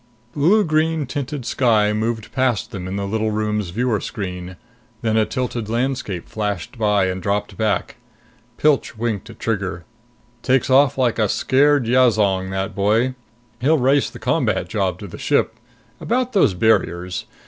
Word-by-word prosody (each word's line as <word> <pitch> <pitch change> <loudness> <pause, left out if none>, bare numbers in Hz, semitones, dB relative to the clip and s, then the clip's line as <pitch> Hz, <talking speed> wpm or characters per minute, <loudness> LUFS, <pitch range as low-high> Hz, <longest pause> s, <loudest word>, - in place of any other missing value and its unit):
Blue 180 +9 +4
green 155 -1 +1
tinted 140 0 -4
sky 110 -4 +2
moved 110 0 -2
past 120 -4 0
them 95 -5 -6
in 95 - -4
the 100 0 -2
little 110 +2 -1
room's 105 -2 -1
viewer 115 +2 0
screen; 90 -3 -6 0.5
then 110 -1 +1
a 110 -1 +3
tilted 120 -4 -3
landscape 120 -6 -2
flashed 105 -4 -4
by 105 -4 +2
and 95 0 -3
dropped 100 +2 -2
back. 110 0 -1 0.6
Pilch 145 -6 +1
winked 110 -4 -3
at - - -12
Trigger. 95 -6 -3 0.6
"Takes 130 0 +1
off 135 0 +4
like 125 -3 +1
a 105 -2 +2
scared 140 +2 +3
yazong, 110 -6 +3
that 95 0 -3
boy! 110 +6 +1 0.5
He'll 150 +6 +3
race 135 +1 +2
the - - -11
combat - - 0
job 95 -5 -1
to 100 - -9
the 85 - -10
ship. - - +1 0.4
About 250 +1 -1
those 180 - +3
barriers. 90 -4 +1
110 Hz, 155 wpm, -21 LUFS, 100-130 Hz, 0.6 s, Blue